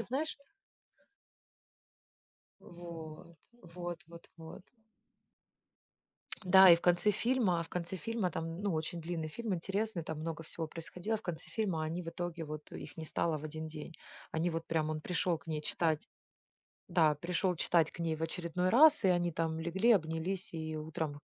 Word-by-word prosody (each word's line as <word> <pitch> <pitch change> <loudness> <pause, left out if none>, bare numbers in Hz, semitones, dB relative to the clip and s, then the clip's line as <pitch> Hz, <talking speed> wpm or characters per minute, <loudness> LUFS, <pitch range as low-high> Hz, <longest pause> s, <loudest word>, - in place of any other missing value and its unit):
знаешь 270 +7 -2 2.3
Вот. 170 -1 -10 0.4
Вот 175 -1 -5
вот 170 0 -13
вот. 160 +1 -10 1.8
Да, 190 0 +9
и - - +10
в 170 - -7
конце 175 +4 +4
фильма 210 -6 +2
в 165 - -8
конце 180 +1 -3
фильма 220 -4 -1
там, 165 +3 -4
ну, 200 -4 +1
очень 160 +2 -2
длинный 165 -1 -3
фильм, 220 +5 -3
интересный, 195 +1 -2
там 160 -1 -5
много 160 0 -4
всего 160 +1 -4
происходило. 175 +7 -4
В - - -14
конце 175 -5 -5
фильма 185 -8 -1
они 165 +3 -2
в 165 - -5
итоге 170 -1 -4
вот 150 0 -7
их - - -8
не 160 - -5
стало 160 0 0
в 150 - -9
один 155 +1 -5
день. 155 +1 -8 0.4
Они 165 +2 +1
вот 165 0 -3
прям, 155 -1 0
он 155 0 -2
пришел 180 -1 0
к - - -21
ней 155 -1 -2
читать 155 0 0 0.8
да, 155 -3 +4
пришел 180 +3 0
читать 165 -1 +3
к - - -13
ней 160 -2 0
в - - -9
очередной 175 +2 -1
раз, 290 +1 +7
и - - +6
они 175 -1 +3
там 160 0 -1
легли, 190 +8 +3
обнялись, 175 +2 -1
и 160 -1 -4
утром 155 0 -3
170 Hz, 165 wpm, -33 LUFS, 160-180 Hz, 2.3 s, и